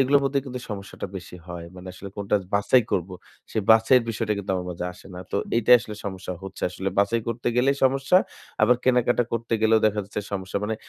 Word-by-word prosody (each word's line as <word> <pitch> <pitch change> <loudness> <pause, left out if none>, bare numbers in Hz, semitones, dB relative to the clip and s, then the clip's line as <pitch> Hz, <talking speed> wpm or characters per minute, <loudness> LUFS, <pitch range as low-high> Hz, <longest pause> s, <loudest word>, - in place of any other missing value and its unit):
এগুলোর 140 +2 +4
মধ্যেই 135 0 +1
কিন্তু 125 -1 -5
সমস্যাটা 100 -1 -6
বেশি 90 -1 -9
হয়। 85 -1 -7
মানে 90 +1 -10
আসলে 95 +2 -9
কোনটা 100 0 -1 0.2
বাছাই 110 +5 +4
করব। 90 0 0 0.4
সেই 110 - 0
বাছাই 110 +3 +6
এর - - -4
বিষয়টা 110 -1 -1
কিন্তু 100 0 -4
আমার 90 -1 -3
মাঝে 90 0 -5
আসে 90 - -16
না। 90 - -7
তো - - -1 0.2
এইটাই 120 +2 +6
আসলে 110 -3 -7
সমস্যা 95 -2 -5
হচ্ছে 95 - -9
আসলে। 95 +2 -3
বাছাই 100 +3 +2
করতে 115 +1 -4
গেলেই 135 +3 +3
সমস্যা। 135 +6 +3 0.5
আবার 125 - +5
কেনাকাটা 125 -1 +3
করতে 115 0 -3
গেলেও 110 0 +5
দেখা 105 0 0
যাচ্ছে 105 +1 -5
সমস্যা। 95 0 -3
মানে 110 +1 -1
110 Hz, 210 wpm, -25 LUFS, 95-125 Hz, 0.5 s, বাছাই